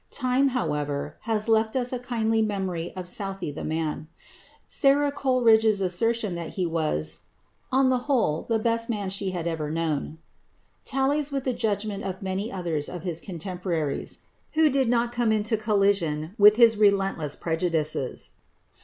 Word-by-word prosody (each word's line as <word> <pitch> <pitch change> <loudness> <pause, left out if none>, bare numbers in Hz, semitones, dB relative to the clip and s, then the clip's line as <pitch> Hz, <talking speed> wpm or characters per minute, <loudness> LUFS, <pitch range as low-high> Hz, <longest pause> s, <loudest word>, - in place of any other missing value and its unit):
Time, 255 +2 +2
however, 150 - -2
has 215 -1 +1
left 220 0 +2
us 250 -1 +1
a 250 - -2
kindly 225 -2 0
memory 190 -5 -2
of 185 -1 -6
Southey 195 -3 -3
the 145 - -7
man. 155 -1 -3 0.6
Sara 285 0 +3
Coleridge's 225 -6 +3
assertion 210 +3 0
that 170 -2 -6
he 185 - 0
was 155 - -1 0.5
"on 260 0 +4
the 255 -1 +2
whole 220 - +1
the 225 - +3
best 230 +1 0
man 205 -4 -2
she 195 0 -1
had 175 -3 -4
ever 160 -3 -2
known," 160 -1 -2 0.7
tallies 275 +2 0
with 275 -2 -2
the 255 - 0
judgment 210 -3 -2
of 190 0 -5
many 190 +4 -3
others 170 -6 -2
of 175 -2 -7
his 170 -3 -3
contemporaries 175 -4 -4 0.3
who 315 -1 +4
did 265 -3 +1
not 235 0 +1
come 240 -2 +1
into 215 +1 +1
collision 195 -7 +1
with 210 0 +7
his 230 -2 +6
relentless 195 -7 +2
prejudices. 160 -5 -2
200 Hz, 155 wpm, -26 LUFS, 170-235 Hz, 0.7 s, with